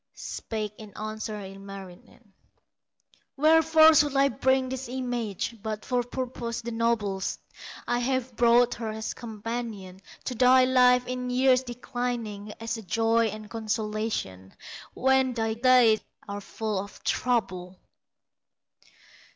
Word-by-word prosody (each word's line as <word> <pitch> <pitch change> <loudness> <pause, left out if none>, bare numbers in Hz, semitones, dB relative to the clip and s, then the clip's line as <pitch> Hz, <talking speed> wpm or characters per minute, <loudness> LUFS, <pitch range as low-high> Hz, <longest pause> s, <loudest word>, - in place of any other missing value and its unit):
Spake 215 -2 -5
in 210 -2 -12
answer 215 0 -5
Ilmarinen: 195 +1 -11 1.0
"Wherefore 320 +1 +6
should 295 -2 +3
I 275 0 +4
bring 260 +2 +1
this 260 -1 -5
image, 240 -4 -3
But 215 0 -5
for 250 -1 +1
purposes 240 -1 -5
the 235 - -4
noblest? 225 -4 -1 0.5
I 240 - +1
have 255 -1 -1
brought 240 +1 +4
her 230 -2 -5
as 220 0 -4
companion 220 -4 -6 0.2
To - - -3
thy 255 +1 +5
life 250 -1 +4
in 250 0 -4
years 255 0 +4
declining, 240 -4 -4
As 230 +1 -3
a - - -7
joy 225 +4 +2
and 215 0 -7
consolation, 215 - -3 0.4
When 265 -1 +2
thy 225 -1 0
days 235 -2 +5 0.3
are 200 0 -5
full 215 0 -3
of 200 +1 -9
trouble!" 190 -7 -1
230 Hz, 120 wpm, -27 LUFS, 215-250 Hz, 1.0 s, Wherefore